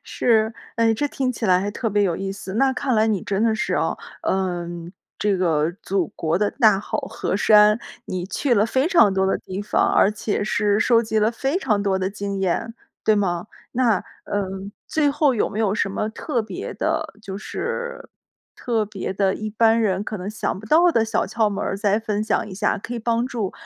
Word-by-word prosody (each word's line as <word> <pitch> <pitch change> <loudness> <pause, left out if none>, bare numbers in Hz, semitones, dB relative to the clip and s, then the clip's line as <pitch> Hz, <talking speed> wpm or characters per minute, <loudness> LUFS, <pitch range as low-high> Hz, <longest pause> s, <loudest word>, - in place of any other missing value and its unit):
是。 220 -2 +1 0.2
诶， 230 -1 +3
这 290 +7 0
听 260 -2 -1
起 225 -2 -3
来 180 0 +4
还 205 +1 -2
特 225 +2 -2
别 205 0 +2
有 180 -4 +1
意 195 0 -3
思。 195 -1 -7
那 265 +4 +3
看 260 -1 -1
来 215 0 +3
你 210 -5 0
真 200 +1 -1
的 225 -1 +3
是 220 - -1
哦， - - 0 0.3
嗯， 175 -2 -2 0.3
这 205 -2 +1
个 165 -2 +1
祖 190 -5 0
国 165 +1 -1
的 205 0 +1
大 220 -7 +4
好 205 - -4
河 - - -3
山， 210 +1 +6 0.3
你 180 -1 -3
去 245 +5 0
了 210 0 +3
非 260 +6 +1
常 230 - +5
多 190 0 +1
的 190 - +1
地 190 +2 -6
方， 205 - +1
而 200 - +5
且 210 0 -2
是 210 -1 +1
收 230 +1 +4
集 220 -1 -1
了 215 +1 +3
非 270 +8 -1
常 215 - 0
多 195 -2 +1
的 190 +1 -1
经 200 -1 -4
验， 195 +5 -1 0.3
对 215 - +4
吗？ 180 -3 0 0.3
那， 235 -6 +2 0.2
嗯， 195 0 -3 0.2
最 295 -2 +2
后 285 -2 +2
有 215 - +1
没 210 - -6
有 205 -2 +1
什 200 - 0
么 215 +2 -2
特 250 +2 -2
别 215 - -6
的 - - -2
就 195 -1 -6
是 480 - -5 0.5
特 225 -3 -1
别 195 -2 -5
的， 195 0 +1
一 215 0 -5
般 225 +1 +3
人 195 -2 +1
可 215 0 -5
能 185 0 -5
想 215 -3 -3
不 215 - -11
到 335 +8 +5
的 230 -9 +2
小 225 0 0
窍 220 -2 +1
门 200 0 -3
儿 - - -2
再 205 +1 +1
分 215 -1 -2
享 215 - 0
一 190 - -8
下？ 205 +2 0
可 235 +4 -6
以 235 - -3
帮 230 +1 0
助， 225 -7 -3
210 Hz, 235 characters per minute, -22 LUFS, 195-230 Hz, 0.5 s, 山